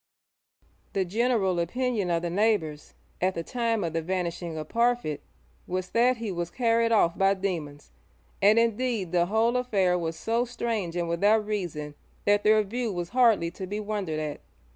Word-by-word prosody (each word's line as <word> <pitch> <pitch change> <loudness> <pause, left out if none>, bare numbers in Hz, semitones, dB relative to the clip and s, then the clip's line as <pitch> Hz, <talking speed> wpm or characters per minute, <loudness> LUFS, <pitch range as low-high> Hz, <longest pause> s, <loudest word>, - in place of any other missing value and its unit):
The 195 -1 +1
general 205 -2 +1
opinion 220 +2 -1
of 170 0 0
the 170 - -2
neighbours 180 -7 0 0.3
at 185 +1 +1
the 165 - -3
time 230 0 -1
of 165 -2 -3
the 165 - 0
vanishing 170 -1 -3
of 155 -1 -5
Parfitt 235 -9 0 0.5
was 185 0 -3
that 245 +2 +3
he 225 -3 -4
was 175 -1 -3
carried 230 +1 +1
off 175 -6 +3
by 195 +1 +3
demons, 165 -7 -4 0.5
and 210 +3 +5
indeed 230 -4 +1
the 175 -1 +2
whole 225 +4 +2
affair 195 -8 +1
was 165 -1 -3
so 230 +2 0
strange 230 -7 -3
and 175 -1 -1
without 205 +6 +2
reason 175 -8 -4 0.3
that 205 0 +3
their 215 0 +5
view 230 +3 -3
was 175 -2 -4
hardly 230 -9 +3
to 185 +1 -7
be 205 +3 -3
wondered 205 -7 -3
at. 150 -1 -4
195 Hz, 170 wpm, -27 LUFS, 170-230 Hz, 0.5 s, and